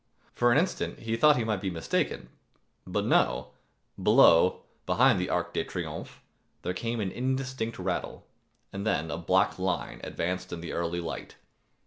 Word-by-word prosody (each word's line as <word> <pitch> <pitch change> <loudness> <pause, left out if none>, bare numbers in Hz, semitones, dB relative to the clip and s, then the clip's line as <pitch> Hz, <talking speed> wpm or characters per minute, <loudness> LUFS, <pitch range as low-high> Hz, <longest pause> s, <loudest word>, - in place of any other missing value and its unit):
For 120 0 +3
an 125 - +5
instant 180 +5 0
he 115 0 -1
thought 150 +6 +6
he 120 - 0
might 105 -4 -1
be 95 - -1
mistaken; 85 -3 -2 0.6
but - - -1
no, - - +2 0.5
below, 85 +2 +5 0.2
behind - - +4
the - - -2
Arc - - -1
de - - 0
Triomphe, - - -6 0.4
there 90 - -1
came 115 +5 -3
an 100 -3 -1
indistinct 130 -2 -2
rattle 90 -1 -3 0.5
and 100 - -4
then 80 -7 0
a - - -3
black 95 +3 +2
line 95 0 -2
advanced 90 +2 -3
in 85 - -4
the 85 - -6
early 85 +1 -2
light. 80 - -6
95 Hz, 160 wpm, -28 LUFS, 85-115 Hz, 0.6 s, thought